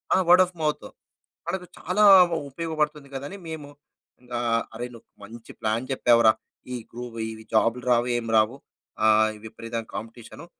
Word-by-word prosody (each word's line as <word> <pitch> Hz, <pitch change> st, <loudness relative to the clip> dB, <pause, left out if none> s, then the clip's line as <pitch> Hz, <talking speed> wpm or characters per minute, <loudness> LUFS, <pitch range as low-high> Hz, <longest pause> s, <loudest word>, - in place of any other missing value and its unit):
ఆ! -, -, +4 dB
Word 180 Hz, +1 st, +8 dB
of 180 Hz, 0 st, -14 dB
mouth. 150 Hz, -1 st, -1 dB, 0.6 s
మనకు 185 Hz, -1 st, -3 dB
చాలా 195 Hz, +4 st, +1 dB, 0.5 s
ఉపయోగపడుతుంది 150 Hz, -2 st, -2 dB
కదా! 135 Hz, +1 st, -5 dB
అని 200 Hz, -, -9 dB
మేము 155 Hz, -3 st, -7 dB, 0.7 s
ఆహ్, 115 Hz, -1 st, +1 dB
అరేయ్! 120 Hz, +2 st, -5 dB
నువ్వు 115 Hz, -, -16 dB, 0.2 s
మంచి 115 Hz, +2 st, -12 dB
ప్లాన్ 110 Hz, +4 st, -1 dB
చెప్పావురా. 115 Hz, -3 st, +5 dB, 0.4 s
ఈ -, -, -2 dB, 0.2 s
గ్రూ 120 Hz, +1 st, -7 dB, 0.2 s
ఈ -, -, -5 dB, 0.2 s
జాబులు 115 Hz, +2 st, +2 dB
రావు 120 Hz, 0 st, +3 dB
ఏమి 115 Hz, -1 st, -4 dB
రావు. 110 Hz, +4 st, +2 dB, 0.5 s
ఆహ్, 110 Hz, 0 st, +5 dB
ఈ -, -, -12 dB
విపరీతమైన 115 Hz, +1 st, -6 dB
కాంపిటీషను. 115 Hz, +7 st, -9 dB
120 Hz, 155 wpm, -25 LUFS, 115-150 Hz, 0.7 s, Word